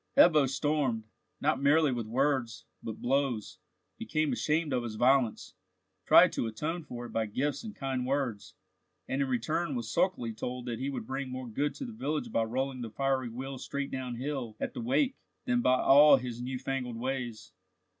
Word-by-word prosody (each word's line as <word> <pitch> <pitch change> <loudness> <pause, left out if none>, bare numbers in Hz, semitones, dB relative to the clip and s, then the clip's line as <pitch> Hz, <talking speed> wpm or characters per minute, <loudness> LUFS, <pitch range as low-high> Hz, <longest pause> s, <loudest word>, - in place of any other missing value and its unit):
Ebbo 155 -5 +7
stormed, 135 -5 0 0.4
not 130 - +1
merely 145 +1 +4
with 120 -3 -3
words, 130 -1 0 0.2
but 110 -1 -6
blows, 130 -4 0 0.4
became 155 -1 0
ashamed 155 -1 0
of 125 - +1
his 115 -2 -5
violence, 125 0 +2 0.5
tried - - +8
to - - -1
atone 155 +10 -3
for 120 -4 -7
it - - -9
by 110 -1 0
gifts 140 - -2
and 215 -2 -7
kind 135 -2 -2
words, 130 -6 -2 0.5
and 135 +1 -1
in 135 - +1
return 140 +5 -1
was 120 -2 -4
sulkily 125 -12 +1
told 125 +3 -5
that 120 -2 -4
he 135 +2 -2
would 140 - -4
bring 135 0 -4
more 130 0 -5
good 145 +6 -1
to 275 - -5
the 240 - -7
village 155 - -3
by - - +2
rolling 130 +3 -2
the 115 - -4
fiery 135 +1 0
wheel 130 +3 -6
straight 140 +1 -4
down 130 -2 -4
hill 125 -4 -4
at - - -3
the - - -5
wake, 250 - +1 0.3
than 245 -1 +2
by 130 - +3
all 145 +1 +8
his 125 -2 -5
new 130 +1 -3
fangled 130 -2 -3
ways. 125 -2 -4
130 Hz, 185 wpm, -30 LUFS, 120-145 Hz, 0.5 s, tried